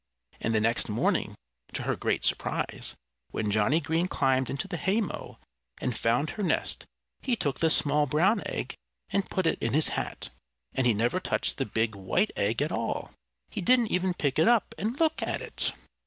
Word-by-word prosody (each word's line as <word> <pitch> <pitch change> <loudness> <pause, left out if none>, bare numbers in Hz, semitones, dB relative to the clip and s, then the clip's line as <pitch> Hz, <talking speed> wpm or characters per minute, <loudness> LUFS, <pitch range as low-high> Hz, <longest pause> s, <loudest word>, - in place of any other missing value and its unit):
And 115 0 0
the - - +4
next 115 +2 +1
morning, - - +1 0.4
to - - -2
her - - 0
great - - 0
surprise, - - -1 0.3
when 105 -2 -1
Johnnie 110 +9 +3
Green 165 +3 0
climbed 130 -6 +1
into 140 +8 -3
the 175 - -3
haymow 200 +2 -1 0.4
and 125 -3 -1
found 120 +7 +1
her 215 - -5
nest 190 - 0 0.3
he 250 - +1
took 145 - -2
the 165 - +3
small 150 -1 +3
brown 185 +9 +3
egg - - -3 0.4
and 200 - 0
put 185 - 0
it 165 - +2
in 115 - 0
his 155 +2 +4
hat. - - -3 0.4
And 130 -2 +2
he 115 - +4
never 120 - +1
touched 185 - 0
the 135 - 0
big, 110 +1 0
white 100 - 0
egg 110 +7 +1
at 150 - -2
all. 115 0 -2 0.4
He - - -3
didn't 240 +3 +4
even 180 0 +1
pick 145 -4 0
it 160 - +5
up 235 -2 +3
and 225 +7 -2
look 320 -1 +2
at - - 0
it! - - -1
150 Hz, 190 wpm, -28 LUFS, 115-190 Hz, 0.4 s, it